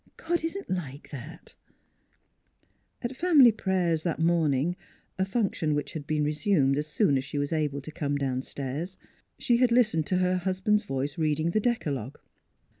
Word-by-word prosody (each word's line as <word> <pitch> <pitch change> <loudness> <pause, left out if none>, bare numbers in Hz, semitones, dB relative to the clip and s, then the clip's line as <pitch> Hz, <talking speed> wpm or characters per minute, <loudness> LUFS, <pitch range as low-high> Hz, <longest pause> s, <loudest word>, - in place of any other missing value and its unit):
God 340 0 -1
isn't 380 +5 -4
like 150 -6 -5
that! 150 +5 -9 0.7
" - - -44
At 240 +2 -3
family 295 -6 +6
prayers 180 -6 0
that 170 0 -2
morning 160 -1 +2 0.4
a 190 - +2
function 195 -7 0
which 145 - -3
had 150 -4 -6
been 150 -1 0
resumed 150 -2 +2
as 150 - -3
soon 150 -3 +2
as - - -4
she 145 - -6
was 145 +2 -1
able 150 -3 -1
to 155 - -8
come 145 -3 -2
downstairs 140 +5 -3 0.4
she 240 - +2
had 250 -1 +3
listened 220 -11 +3
to 185 - +1
her 185 0 +2
hus 185 +1 -2
band's 210 +2 +2
voice 140 -2 -3
reading 155 +1 +1
the 215 - +2
decalogue. 145 - -2
165 Hz, 170 wpm, -27 LUFS, 145-200 Hz, 0.7 s, family